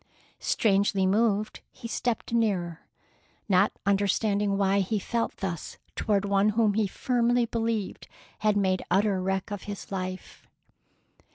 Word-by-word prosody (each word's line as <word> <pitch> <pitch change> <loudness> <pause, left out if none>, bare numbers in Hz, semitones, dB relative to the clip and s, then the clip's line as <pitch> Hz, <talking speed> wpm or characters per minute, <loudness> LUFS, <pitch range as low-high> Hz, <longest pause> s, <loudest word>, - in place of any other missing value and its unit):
Strangely 200 -2 +2
moved, 210 +1 +1
he 240 - -8
stepped 235 0 -2
nearer, 185 -8 0 0.6
not 195 0 +4
understanding 200 0 +1
why 200 0 +2
he 200 +3 0
felt 230 +3 -2
thus 175 -5 -5 0.2
toward 205 -2 +1
one 200 +1 +3
whom 215 -1 +2
he 210 0 +1
firmly 240 +3 +1
believed 225 -3 -2 0.3
had 210 -1 +2
made 190 -2 +1
utter 195 -1 +2
wreck 190 +1 -2
of 205 -2 -5
his 200 -1 -7
life. 185 -1 -6
200 Hz, 125 wpm, -27 LUFS, 195-220 Hz, 0.6 s, not